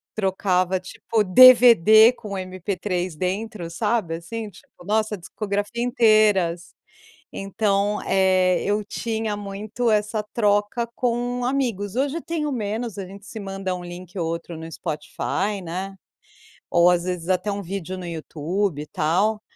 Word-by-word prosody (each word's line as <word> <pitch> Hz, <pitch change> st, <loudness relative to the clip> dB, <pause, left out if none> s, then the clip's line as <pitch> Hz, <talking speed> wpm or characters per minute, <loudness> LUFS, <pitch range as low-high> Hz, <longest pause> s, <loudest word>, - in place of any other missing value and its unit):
Trocava 190 Hz, -2 st, +1 dB
tipo 220 Hz, +3 st, -2 dB
DVD 230 Hz, 0 st, +8 dB
com 215 Hz, -4 st, -10 dB
MP3 185 Hz, -1 st, -3 dB
dentro, 190 Hz, 0 st, -3 dB
sabe, 205 Hz, -2 st, -1 dB
assim, 215 Hz, +6 st, -6 dB
tipo, 175 Hz, -1 st, -18 dB
nossa, 215 Hz, 0 st, 0 dB
discografia 205 Hz, +5 st, -3 dB
inteiras. 215 Hz, -8 st, +3 dB, 0.6 s
Então, 200 Hz, +1 st, 0 dB
eh, 185 Hz, -1 st, +3 dB
eu 205 Hz, +1 st, 0 dB
tinha 220 Hz, 0 st, -3 dB
muito 205 Hz, +4 st, -3 dB
essa 210 Hz, 0 st, 0 dB
troca 210 Hz, +2 st, +1 dB
com 245 Hz, 0 st, -1 dB
amigos. 235 Hz, -6 st, -1 dB
Hoje 280 Hz, +4 st, 0 dB
eu -, -, -5 dB
tenho 305 Hz, -3 st, -3 dB
menos. 220 Hz, -2 st, -3 dB
A 195 Hz, -, -4 dB
gente 195 Hz, +2 st, -12 dB
se 220 Hz, -, -8 dB
manda 195 Hz, -2 st, -4 dB
um 180 Hz, -, -7 dB
link 175 Hz, +1 st, -9 dB
ou 170 Hz, -, -1 dB
outro 170 Hz, 0 st, -5 dB
no 165 Hz, 0 st, -8 dB
Spotify, 190 Hz, +7 st, -3 dB
né, 190 Hz, +3 st, -5 dB, 0.7 s
ou 175 Hz, +1 st, +5 dB
às 175 Hz, -1 st, +1 dB
vezes 180 Hz, -1 st, -4 dB
até 185 Hz, +3 st, +1 dB
um 200 Hz, 0 st, -3 dB
vídeo 185 Hz, 0 st, -5 dB
no 180 Hz, -, -7 dB
YouTube 165 Hz, +1 st, -3 dB
e -, -, -13 dB
tal, 200 Hz, +8 st, 0 dB
200 Hz, 140 wpm, -23 LUFS, 180-220 Hz, 0.7 s, DVD